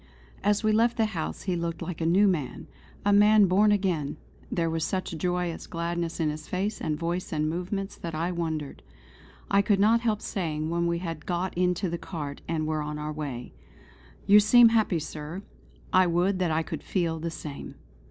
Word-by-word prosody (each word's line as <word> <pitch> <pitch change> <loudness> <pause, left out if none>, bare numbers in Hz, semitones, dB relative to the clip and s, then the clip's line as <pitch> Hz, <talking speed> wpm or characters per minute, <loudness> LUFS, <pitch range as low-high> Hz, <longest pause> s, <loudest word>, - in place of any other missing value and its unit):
As 205 +2 +2
we 215 - +3
left 230 +2 +3
the 225 - +3
house 175 -7 -4
he 185 -3 -1
looked 170 -1 -3
like 175 -2 -5
a 160 - +1
new 195 +5 +5
man 155 -9 -2 0.4
a 205 - +4
man 210 0 +6
born 200 +3 +4
again; 185 -8 0 0.3
there 170 -1 0
was 165 -1 -1
such 185 -2 -2
joyous 175 +1 -2
gladness 170 0 -3
in 155 -2 +1
his 155 +1 -8
face 195 +3 -2
and 150 -1 -1
voice 170 +2 -3
and 155 -2 0
movements 180 +4 -3
that 165 -2 -6
I 170 +3 -1
wondered. 160 -4 -3 0.7
I 200 - +5
could 200 -1 +2
not 225 +3 +4
help 220 -3 0
saying 160 -4 -2
when 170 0 +1
we 170 0 0
had 165 -3 -6
got 180 +1 -2
into 180 +2 +1
the 170 0 -3
cart 145 -5 -6
and 160 -1 -1
were 155 0 -1
on 150 0 -4
our 150 0 -4
way: 140 -5 -6 0.7
"You 205 +1 +8
seem 230 +3 +7
happy, 220 -6 +2
Sir. 155 +4 -6 0.5
I 185 0 +5
would 180 +3 +1
that 180 -2 +1
I 160 +1 +1
could - - -6
feel 165 -4 -1
the 165 +1 -3
same." 150 -3 -8
175 Hz, 195 wpm, -27 LUFS, 160-195 Hz, 0.7 s, You